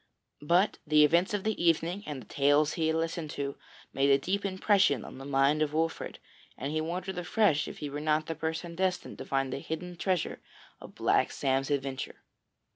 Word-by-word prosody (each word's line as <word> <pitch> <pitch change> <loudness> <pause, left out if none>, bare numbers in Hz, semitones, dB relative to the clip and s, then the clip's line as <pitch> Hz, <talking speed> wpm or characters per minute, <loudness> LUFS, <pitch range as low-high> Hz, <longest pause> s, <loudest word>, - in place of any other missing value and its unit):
But 175 +7 +2
the 150 0 +6
events 175 +7 +3
of 205 -2 -1
the 220 -4 -1
evening, 170 +3 +2
and 145 -3 -4
the - - -20
tales 145 +2 +3
he 160 -2 0
had 160 - +1
listened 165 -1 -2
to, 140 -1 -3 0.4
made 135 +1 +2
a 135 - +6
deep 190 +8 -2
impression 195 +1 +2
on - - -10
the 135 - -8
mind 140 +2 +2
of 150 -1 0
Wolfert, 160 +1 -1 0.4
and 140 +2 -3
he 155 0 0
wondered 180 +3 -3
afresh 175 -4 +2
if - - -8
he 145 - -5
were 145 - -4
not 155 +1 +1
the 165 - -3
person 160 +2 -4
destined 185 0 -2
to - - -6
find 135 -1 -1
the - - -3
hidden 175 +4 -5
treasure 180 -1 -1 0.4
of - - -12
Black - - +2
Sam's 135 0 0
adventure. 135 -2 -3
160 Hz, 200 wpm, -30 LUFS, 145-180 Hz, 0.4 s, the